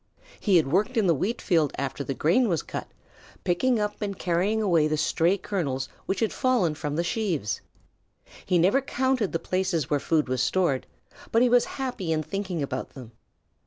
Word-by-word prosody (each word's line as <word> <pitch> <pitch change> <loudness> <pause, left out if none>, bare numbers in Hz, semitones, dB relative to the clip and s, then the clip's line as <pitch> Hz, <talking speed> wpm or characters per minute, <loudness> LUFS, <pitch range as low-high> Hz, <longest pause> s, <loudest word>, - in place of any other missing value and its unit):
He 195 -4 +4
had 150 -5 +1
worked 210 - +1
in 220 - +3
the 170 - +4
wheatfield 170 - 0
after 140 +1 -3
the 135 - -4
grain 205 - +3
was 165 -5 0
cut, - - -6 0.6
picking 230 +7 +2
up 210 +1 -3
and 200 -2 -3
carrying 185 +5 +1
away 170 -8 +3
the 155 0 0
stray 170 +5 +2
kernels 140 -10 -2 0.2
which 195 - -1
had 225 - +1
fallen 245 -11 +2
from 150 -1 -4
the 170 - 0
sheaves. 175 - -1 0.8
He 180 - +2
never 190 +11 +4
counted 260 -5 0
the - - 0
places 185 -4 -1
where 145 - +3
food 155 0 +1
was 130 0 0
stored, 140 -1 +1 0.4
but 230 +2 +4
he 250 - +4
was 245 0 +4
happy 250 -11 -3
in 155 -1 0
thinking 190 -3 -3
about 130 -2 -5
them. 125 -4 -10
180 Hz, 185 wpm, -26 LUFS, 155-210 Hz, 0.8 s, He